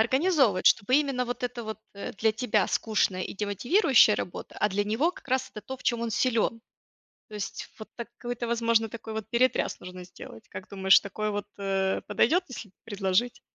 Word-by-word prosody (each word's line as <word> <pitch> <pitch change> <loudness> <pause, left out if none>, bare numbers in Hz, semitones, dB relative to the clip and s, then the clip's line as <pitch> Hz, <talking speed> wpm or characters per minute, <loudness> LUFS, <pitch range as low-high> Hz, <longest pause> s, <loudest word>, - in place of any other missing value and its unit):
организовывать, 260 - +3
чтобы 250 +7 +5
именно 275 -4 0
вот 245 +2 -5
это 245 -1 -3
вот, 220 0 -6
э, 200 - -6
для 220 +2 +2
тебя 220 -3 +1
скучная 195 -4 0
и - - -5
демотивирующая 220 - +4
работа, 175 - -6
а 210 - +1
для 205 +2 0
него 230 +12 +1
как 320 - -16
раз 260 0 0
это 210 - -6
то, 265 - -5
в - - -17
чём 235 -2 0
он 235 -1 -2
силен. 230 -1 +1 0.7
То 215 - -9
есть 205 - -5
вот 220 - -9
такой-то, 240 0 -5
возможно, 230 -1 +2
такой 225 0 -8
вот 220 -1 -4
перетряс 255 +2 +1
нужно 180 0 -9
сделать. 215 +4 -12
Как 185 - -9
думаешь, 190 -1 +5
такое 215 +1 -3
вот, 205 0 -3
э, 195 -1 0
подойдет, 250 - +3
если 225 -5 -8
предложить? 205 +3 0
225 Hz, 185 wpm, -27 LUFS, 205-245 Hz, 0.7 s, чтобы